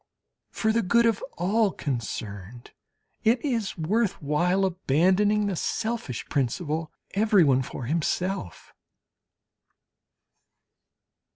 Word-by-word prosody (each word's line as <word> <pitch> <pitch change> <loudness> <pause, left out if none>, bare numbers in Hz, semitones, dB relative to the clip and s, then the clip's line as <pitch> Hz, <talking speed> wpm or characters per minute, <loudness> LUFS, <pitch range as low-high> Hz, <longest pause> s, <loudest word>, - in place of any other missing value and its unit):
For 220 -1 0
the 230 - +2
good 235 +5 +3
of 225 -3 +1
all 205 +4 +2
concerned, 115 - -5 0.5
it 235 +3 +4
is 230 -8 -1
worth 200 +6 0
while 175 +6 +1
abandoning 190 +5 +2
the 200 -2 -1
selfish 220 - -3
principle: 155 +4 -2 0.2
"Everyone 190 -11 +4
for 130 - -6
himself." 170 - -2
180 Hz, 90 wpm, -26 LUFS, 145-210 Hz, 0.5 s, it